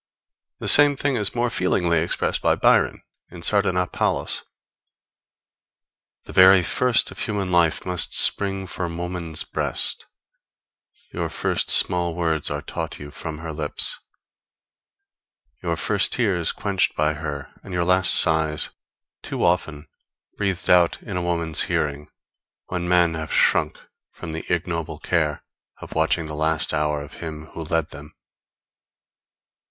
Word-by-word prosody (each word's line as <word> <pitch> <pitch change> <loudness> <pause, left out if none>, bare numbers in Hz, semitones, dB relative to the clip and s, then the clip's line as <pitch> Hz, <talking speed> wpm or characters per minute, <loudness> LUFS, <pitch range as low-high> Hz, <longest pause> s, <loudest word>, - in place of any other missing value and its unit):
The - - -5
same 145 -1 +7
thing 140 -1 0
is 105 -2 -1
more 120 0 0
feelingly 90 -5 +1
expressed 85 - -1
by - - +2
Byron - - +2 0.3
in 85 -1 -11
Sardanapalus: 90 -3 0 1.8
_The - - -10
very 95 0 +7
first 125 +5 +2
Of - - -11
human 100 -4 -3
life 85 -3 +2
must 90 -1 +1
spring 95 -1 +2
from 85 -2 -4
woman's 90 -2 -4
breast, - - -2 1.1
Your - - -3
first - - -2
small 85 -2 +4
words 80 -3 0
are 75 +1 -4
taught - - -5
you 75 0 -10
from 80 0 -7
her 80 0 -7
lips, 75 - -1 1.6
Your - - -2
first - - +2
tears 95 -9 +1
quench'd 100 -2 -1
by 75 0 +1
her, 75 -2 -6
and 100 - -11
your 90 -1 -1
last 90 +1 +4
sighs 80 -2 +3 0.5
Too - - -4
often 80 -3 -1 0.5
breathed 95 -3 -2
out 90 -1 +4
in 100 - -6
a 90 - -1
woman's 85 -2 -1
hearing, 75 0 -2 0.6
When 90 -1 -3
men 90 -2 +3
have 80 -1 -5
shrunk - - +2 0.3
from 85 - -9
the 80 +1 -6
ignoble 85 -3 -2
care 75 -2 -1 0.4
Of - - -10
watching 80 +1 +1
the 75 - -7
last 80 0 -1
hour 75 -1 -1
of 70 - -13
him 80 -2 -7
who 80 - -6
led 80 0 -1
them_. 75 +2 -11
85 Hz, 135 wpm, -22 LUFS, 80-90 Hz, 1.8 s, same